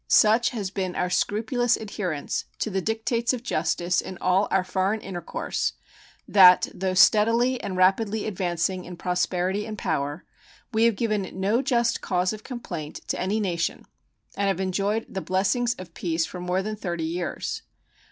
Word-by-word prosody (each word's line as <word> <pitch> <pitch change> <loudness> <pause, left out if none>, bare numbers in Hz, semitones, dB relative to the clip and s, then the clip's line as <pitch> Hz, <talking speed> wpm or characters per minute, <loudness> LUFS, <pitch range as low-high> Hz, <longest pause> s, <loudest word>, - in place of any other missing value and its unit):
Such 220 +3 +5
has 205 -6 -4
been 185 -2 -3
our 180 - -1
scrupulous 230 +5 +1
adherence 185 -8 -3
to 215 - -2
the 190 0 0
dictates 230 +3 0
of 245 -2 -4
justice 175 -1 0
in 185 - -8
all 185 +2 +2
our 190 -1 +2
foreign 190 +3 0
intercourse 180 -5 -3 0.5
that, 185 -2 +7
though 185 0 -2
steadily 230 +6 +4
and 185 - -4
rapidly 200 +3 +2
advancing 180 -2 -1
in 175 0 -9
prosperity 180 +2 0
and 215 -1 -6
power, 145 -1 -2 0.5
we 220 +1 +4
have 230 -2 +3
given 210 -3 -1
no 205 +6 +2
just 240 -3 +1
cause 185 +1 0
of 215 - -9
complaint 175 - -6
to - - -1
any 205 +4 0
nation 170 -5 -2 0.5
and 200 - 0
have 195 -2 0
enjoyed 200 +4 0
the 190 - -5
blessings 200 +7 +1
of 180 -2 -11
peace 165 -2 -1
for 180 - -8
more 180 +2 -1
than 215 +1 -3
thirty 170 -5 -4
years. 170 +1 -3
195 Hz, 160 wpm, -25 LUFS, 180-220 Hz, 0.5 s, that